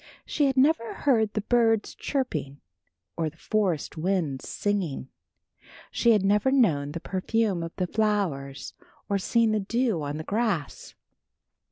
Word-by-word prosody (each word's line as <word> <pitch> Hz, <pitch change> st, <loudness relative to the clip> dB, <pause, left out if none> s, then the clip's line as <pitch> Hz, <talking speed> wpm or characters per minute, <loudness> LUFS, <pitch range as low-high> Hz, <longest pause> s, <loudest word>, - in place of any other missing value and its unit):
She 290 Hz, -2 st, +1 dB
had 270 Hz, -1 st, -1 dB
never 260 Hz, -3 st, +3 dB
heard 225 Hz, -7 st, +2 dB
the 215 Hz, -, -1 dB
birds 225 Hz, -1 st, +2 dB
chirping 155 Hz, -, -3 dB, 0.6 s
or 160 Hz, -2 st, -1 dB
the 160 Hz, -, -22 dB
forest 185 Hz, -6 st, -1 dB
winds 160 Hz, -6 st, -1 dB
sighing. 185 Hz, -10 st, -2 dB, 0.8 s
She 235 Hz, -1 st, +4 dB
had 205 Hz, -3 st, +2 dB
never 205 Hz, +5 st, +3 dB
known 155 Hz, -, +2 dB
the 170 Hz, -, -4 dB
perfume 195 Hz, +1 st, -1 dB
of 165 Hz, 0 st, -6 dB
the 185 Hz, -, -1 dB
flowers 180 Hz, -10 st, -1 dB, 0.4 s
or 200 Hz, -1 st, +1 dB
seen 230 Hz, +3 st, +2 dB
the 215 Hz, -, +1 dB
dew 225 Hz, -2 st, 0 dB
on 145 Hz, 0 st, -3 dB
the 155 Hz, -, -5 dB
grass. 200 Hz, -6 st, -2 dB
200 Hz, 145 wpm, -26 LUFS, 160-230 Hz, 0.8 s, She